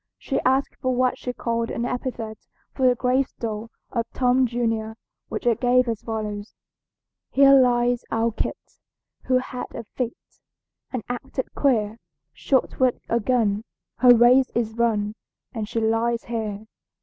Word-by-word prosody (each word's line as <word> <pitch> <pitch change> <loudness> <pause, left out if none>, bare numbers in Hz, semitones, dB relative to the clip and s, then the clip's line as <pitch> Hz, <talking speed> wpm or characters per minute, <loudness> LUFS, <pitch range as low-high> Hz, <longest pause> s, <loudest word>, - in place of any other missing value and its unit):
She - - -2
asked 265 +2 +1
for 255 -2 -1
what 255 0 +1
she 250 - -3
called 230 -1 -2
an 235 - -2
epithet 240 -4 -5 0.3
for 260 -2 +2
the 250 - +4
gravestone 240 -4 -1 0.2
of 230 -1 -2
Tom 250 0 +3
junior, 225 -2 -2 0.3
which - - -5
I 240 - +5
gave 250 +2 +3
as 225 -2 -2
follows: 210 -2 -5 0.7
"Here 275 0 +6
lies 245 -2 +4
our 225 +1 +1
Kit, 220 - -3 0.7
Who 255 0 +3
had 255 0 -4
a 230 - -5
fit, 235 +2 -4 0.7
And 250 -4 -3
acted 260 +1 -4
queer, 225 -5 +1 0.3
Shot 260 - 0
with 255 -2 +2
a 235 - +2
gun, 220 -3 +1 0.3
Her 245 0 +7
race 250 +3 +5
is 225 -2 0
run, 220 -3 0 0.4
And 220 -3 -4
she 235 - -1
lies 225 +1 +1
here." 220 -3 -4
235 Hz, 150 wpm, -24 LUFS, 225-255 Hz, 0.7 s, Her